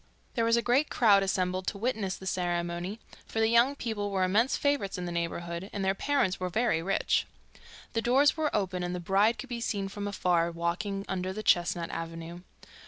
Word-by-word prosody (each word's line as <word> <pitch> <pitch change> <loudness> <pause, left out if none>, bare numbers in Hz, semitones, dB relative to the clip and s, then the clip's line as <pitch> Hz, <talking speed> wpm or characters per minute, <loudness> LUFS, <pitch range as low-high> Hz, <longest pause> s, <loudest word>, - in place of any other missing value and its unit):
There 230 -2 +1
was 230 +1 +4
a 235 - +1
great 265 +5 +2
crowd 205 -4 +5
assembled 185 -1 -1
to - - -2
witness 215 -4 -1
the 190 - -11
ceremony, 175 +2 -2 0.3
for 225 - -3
the 220 0 +3
young 235 +4 +4
people 220 -6 -3
were 190 -2 0
immense 215 +8 +2
favourites 285 -10 0
in 180 - -4
the 175 - -4
neighbourhood, 170 +2 -3
and 195 -1 -3
their 190 - +3
parents 230 -3 0
were 185 0 -2
very 215 -4 +1
rich. 195 +4 +1 0.7
The 225 - +1
doors 265 +5 +4
were 315 -1 0
open, 185 -3 -1
and 180 0 -2
the - - -3
bride 195 +6 +2
could 265 - -8
be 235 -1 -4
seen 200 -4 -2
from 205 0 -5
afar, 175 -4 +1
walking 175 +4 -2
under 185 -1 -2
the 215 +2 -5
chestnut 175 -2 +2
avenue. 165 +1 -6
195 Hz, 200 wpm, -29 LUFS, 175-230 Hz, 0.7 s, crowd